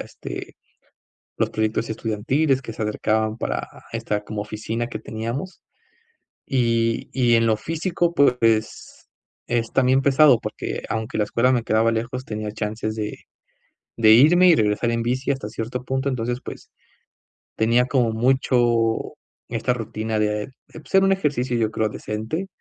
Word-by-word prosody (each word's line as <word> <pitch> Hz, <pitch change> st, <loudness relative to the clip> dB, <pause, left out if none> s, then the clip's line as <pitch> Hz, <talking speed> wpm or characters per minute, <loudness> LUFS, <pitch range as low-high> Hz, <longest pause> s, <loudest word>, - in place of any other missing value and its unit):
este, -, -, -8 dB, 0.8 s
los -, -, 0 dB
proyectos 110 Hz, +1 st, -1 dB
estudiantiles 130 Hz, +6 st, 0 dB
que 115 Hz, -, -7 dB
se 110 Hz, -, -5 dB
acercaban 110 Hz, +1 st, 0 dB
para -, -, -3 dB, 0.3 s
esta 105 Hz, 0 st, -2 dB
como 105 Hz, 0 st, -5 dB
oficina 110 Hz, +2 st, -4 dB
que 120 Hz, -, -6 dB
teníamos. 115 Hz, -, -5 dB, 0.9 s
Y 115 Hz, -3 st, +1 dB
y 120 Hz, -3 st, +3 dB
en 115 Hz, 0 st, +3 dB
lo 110 Hz, -1 st, +2 dB
físico, 170 Hz, -, -1 dB
pues, 115 Hz, -5 st, +1 dB, 0.4 s
es 115 Hz, -1 st, -1 dB
también 130 Hz, +1 st, +3 dB
pesado 140 Hz, -2 st, +5 dB
porque, -, -, -5 dB
aunque 110 Hz, -1 st, -3 dB
la 105 Hz, -, +2 dB
escuela 125 Hz, +4 st, +2 dB
me 120 Hz, -3 st, +1 dB
quedaba 110 Hz, +1 st, +2 dB
lejos, 120 Hz, +3 st, -3 dB
tenía 105 Hz, -2 st, -4 dB
chances 110 Hz, 0 st, -3 dB
de 105 Hz, -1 st, -4 dB, 0.8 s
de 110 Hz, -2 st, +5 dB
irme 165 Hz, +10 st, +7 dB
y 170 Hz, -, +6 dB
regresar 110 Hz, +2 st, +1 dB
en 115 Hz, 0 st, -1 dB
bici, 130 Hz, +4 st, -1 dB
hasta 135 Hz, -6 st, -2 dB
cierto 120 Hz, +3 st, -5 dB
punto. 135 Hz, +1 st, -1 dB
Entonces, 120 Hz, -1 st, -2 dB
pues, -, -, -9 dB, 0.9 s
tenía 115 Hz, +3 st, +3 dB
como 125 Hz, -4 st, +2 dB
mucho 120 Hz, -2 st, +1 dB, 0.3 s
esta 125 Hz, -, 0 dB
rutina 110 Hz, -1 st, -3 dB
de, 105 Hz, +3 st, -1 dB, 0.2 s
pues, 160 Hz, +4 st, -6 dB
era 195 Hz, -, +6 dB
un 195 Hz, -, +3 dB
ejercicio 140 Hz, -9 st, 0 dB
yo 110 Hz, -1 st, 0 dB
creo 110 Hz, -1 st, 0 dB
decente 110 Hz, -, -4 dB
115 Hz, 150 wpm, -22 LUFS, 110-130 Hz, 0.9 s, irme